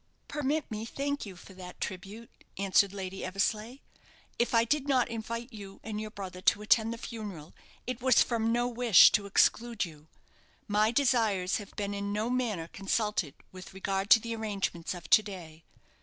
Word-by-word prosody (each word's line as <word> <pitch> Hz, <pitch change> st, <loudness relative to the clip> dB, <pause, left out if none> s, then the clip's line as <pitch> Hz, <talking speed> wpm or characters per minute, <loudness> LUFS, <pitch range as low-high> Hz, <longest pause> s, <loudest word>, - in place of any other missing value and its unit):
"Permit 295 Hz, 0 st, -2 dB
me 215 Hz, 0 st, -4 dB
thank 280 Hz, +2 st, -3 dB
you 190 Hz, -, -9 dB
for 185 Hz, +2 st, -14 dB
that 180 Hz, -1 st, -11 dB
tribute," 200 Hz, +4 st, -6 dB, 0.3 s
answered 195 Hz, 0 st, +3 dB
Lady 190 Hz, -1 st, -6 dB
Eversleigh. 210 Hz, +5 st, -1 dB, 0.6 s
"If 240 Hz, 0 st, +1 dB
I 230 Hz, -, +5 dB
did 285 Hz, +4 st, 0 dB
not 260 Hz, -3 st, +3 dB
invite 230 Hz, +2 st, -5 dB
you 200 Hz, -2 st, -10 dB
and 215 Hz, -1 st, -4 dB
your 215 Hz, -, -5 dB
brother 185 Hz, -3 st, -8 dB
to 210 Hz, -, +3 dB
attend 225 Hz, +1 st, +3 dB
the 230 Hz, -, -5 dB
funeral, 205 Hz, -10 st, -8 dB, 0.3 s
it 250 Hz, -1 st, -4 dB
was 260 Hz, -1 st, +5 dB
from 230 Hz, -1 st, 0 dB
no 240 Hz, +1 st, +1 dB
wish 240 Hz, -5 st, +6 dB
to 205 Hz, -1 st, +1 dB
exclude 230 Hz, +2 st, +2 dB
you. 155 Hz, -2 st, -14 dB, 0.6 s
My 210 Hz, +1 st, +3 dB
desires 225 Hz, -7 st, +2 dB
have 205 Hz, -2 st, -10 dB
been 205 Hz, -1 st, -3 dB
in 200 Hz, 0 st, -3 dB
no 215 Hz, +4 st, -1 dB
manner 225 Hz, -10 st, -1 dB
consulted 195 Hz, -5 st, -1 dB, 0.2 s
with 185 Hz, +1 st, -11 dB
regard 195 Hz, +1 st, -2 dB
to -, -, +9 dB
the 230 Hz, +1 st, -4 dB
arrangements 195 Hz, -6 st, -3 dB
of 170 Hz, -3 st, -10 dB
to 215 Hz, -, +8 dB
day. 170 Hz, -6 st, -10 dB
210 Hz, 175 wpm, -30 LUFS, 195-230 Hz, 0.6 s, to